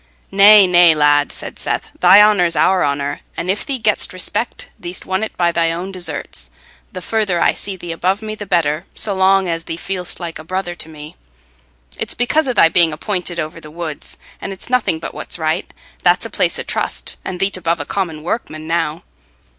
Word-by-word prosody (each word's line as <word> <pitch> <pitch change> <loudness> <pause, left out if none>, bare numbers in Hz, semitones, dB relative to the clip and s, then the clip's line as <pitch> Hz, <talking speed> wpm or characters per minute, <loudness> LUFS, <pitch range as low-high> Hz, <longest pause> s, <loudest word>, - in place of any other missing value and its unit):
"Nay, 200 +1 +8
nay, 175 -2 +6
lad," 145 -1 +3
said - - -8
Seth, - - -3
"thy 205 +2 +8
honour's 180 -5 +3
our 185 -1 +3
honour; 140 0 -1 0.2
and 180 - 0
if 200 - -2
thee 275 -3 -3
get'st 215 -5 0
respect, 185 +5 -2
thee'st 175 +1 -6
won 190 +1 -1
it 220 - -5
by 175 -1 +2
thy 165 -1 +1
own 175 +3 -4
deserts. 185 -2 -5 0.4
The 185 - -7
further 210 -5 0
I - - +3
see 200 -1 -4
thee 175 -2 -7
above 185 +5 -1
me, 215 0 -4
the 210 -1 -8
better, 170 -2 0
so 205 - 0
long 190 0 +3
as 165 -1 -3
thee 165 - -5
feel'st 180 0 -5
like 170 -3 -6
a - - -9
brother 185 +1 -3
to 165 -2 -8
me. 150 0 -10 0.8
It's - - 0
because 285 +5 +1
o' 255 - 0
thy 165 - +6
being 165 0 +4
appointed 175 0 -3
over 155 +1 -5
the 150 - -11
woods, 160 -1 -5 0.2
and - - -5
it's 195 +5 -9
nothing 250 -10 +2
but 160 - -7
what's - - -5
right. 160 +2 -1 0.3
That's - - +3
a - - -7
place - - +1
o' - - -3
trust, - - -3
and 180 -1 -5
thee't 195 0 +1
above 170 -1 -1
a 145 - -4
common 165 -5 -3
workman 155 -4 -4
now." 165 0 -1
175 Hz, 205 wpm, -18 LUFS, 165-195 Hz, 0.8 s, Nay